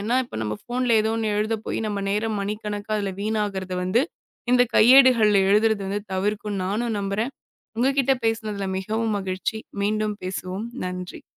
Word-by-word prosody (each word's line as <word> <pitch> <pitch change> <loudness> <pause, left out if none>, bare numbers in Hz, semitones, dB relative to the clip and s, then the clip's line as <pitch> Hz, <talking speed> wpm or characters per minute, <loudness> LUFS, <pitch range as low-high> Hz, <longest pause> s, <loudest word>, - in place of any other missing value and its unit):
ஏன்னா, 225 +5 0
இப்போ - - -9
நம்ம 105 -1 -2
போன்ல 245 -1 +2
ஏதோ 220 +1 0
ஒண்ணு 220 -1 0
எழுதப் 215 +1 -1
போய், - - -2
நம்ம 205 -1 -2
நேரம் 215 +1 -1
மணிக்கணக்கா 210 +1 -4
அதுல 200 -2 -2
வீணாகுறது 205 -3 -2
வந்து 190 +7 +2 0.5
இந்தக் 245 -1 +4
கையேடுகள் 245 -2 +7 0.2
எழுதுறது 205 -1 +2 0.2
தவிர்க்கும். 205 +1 -1
நானும் 220 +4 -1
நம்புறேன். 200 +6 -2 0.5
உங்ககிட்ட 270 +2 +2
பேசினதுல 215 -3 -1
மிகவும் 220 +2 -1
மகிழ்ச்சி. 190 +3 -3 0.2
மீண்டும் 215 0 0
பேசுவோம். 185 +3 -4 0.2
நன்றி. 180 0 -6
210 Hz, 145 wpm, -24 LUFS, 200-225 Hz, 0.5 s, கையேடுகள்